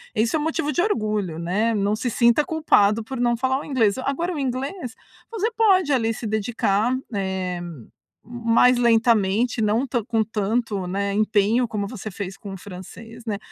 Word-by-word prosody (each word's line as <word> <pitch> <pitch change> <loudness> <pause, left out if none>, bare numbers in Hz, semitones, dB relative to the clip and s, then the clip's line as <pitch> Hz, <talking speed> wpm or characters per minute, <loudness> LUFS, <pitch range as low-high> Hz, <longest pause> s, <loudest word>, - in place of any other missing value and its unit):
isso 225 +6 +1
é - - +1
o - - -2
motivo 300 -1 -1
de 345 - +1
orgulho, 215 - -1
né. 205 +7 0
Não 205 0 +1
se 245 +3 -2
sinta 235 +4 +3
culpado 230 - +2
por 265 +3 -6
não 240 -1 +2
falar 260 +2 0
o - - -8
inglês. 230 -7 +1
Agora 305 +7 -2
o 305 - -4
inglês, 265 +1 -4 0.3
você 445 0 -1
pode, 390 -8 +3
ali, 230 -3 +1
se 225 - -7
dedicar, 220 +2 0 0.2
eh, 190 -2 -2
m 165 -9 -9 0.4
mais 240 +1 +3
lentamente, 230 -1 +2
não 215 +5 +1
tan 245 -3 -2
com 225 -2 +1
tanto, 210 -2 -2
né, 200 +2 -2
empenho, 215 +3 +2
como 210 -2 -3
você 215 -2 -7
fez 195 -1 -6
com 200 -2 -8
o - - -7
francês, 205 +5 -11
né. 210 -3 -2
225 Hz, 180 wpm, -23 LUFS, 205-255 Hz, 0.4 s, sinta